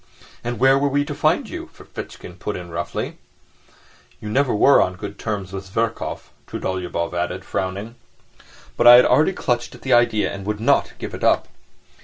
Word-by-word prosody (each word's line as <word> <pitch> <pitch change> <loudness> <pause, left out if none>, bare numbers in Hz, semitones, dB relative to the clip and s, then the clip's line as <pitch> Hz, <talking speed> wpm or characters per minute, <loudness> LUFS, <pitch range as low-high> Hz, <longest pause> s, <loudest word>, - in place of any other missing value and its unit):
"And 120 0 -3
where 135 +1 +5
were 145 - +2
we 145 +1 +1
to 145 - -5
find - - +1
you?" - - -7
Ferfitchkin - - -10
put - - -3
in 85 -1 -8
roughly. 85 +1 -4 1.0
"You 105 - -7
never 130 +3 +2
were 140 +7 +5
on 90 - 0
good 100 +3 -8
terms 100 -4 -4
with 95 0 -6
Zverkov," 115 +4 -3 0.2
Trudolyubov 90 -2 -3
added, 85 0 -3
frowning. 95 +5 -3 0.8
But - - +3
I 120 - +12
had 125 - +7
already 150 +9 +4
clutched 120 -7 -2
at - - -16
the 130 - +1
idea 120 -3 +3
and 100 0 -7
would 105 0 -2
not 115 - +2
give - - -7
it - - -7
up. - - +3
110 Hz, 180 wpm, -21 LUFS, 95-125 Hz, 1.0 s, I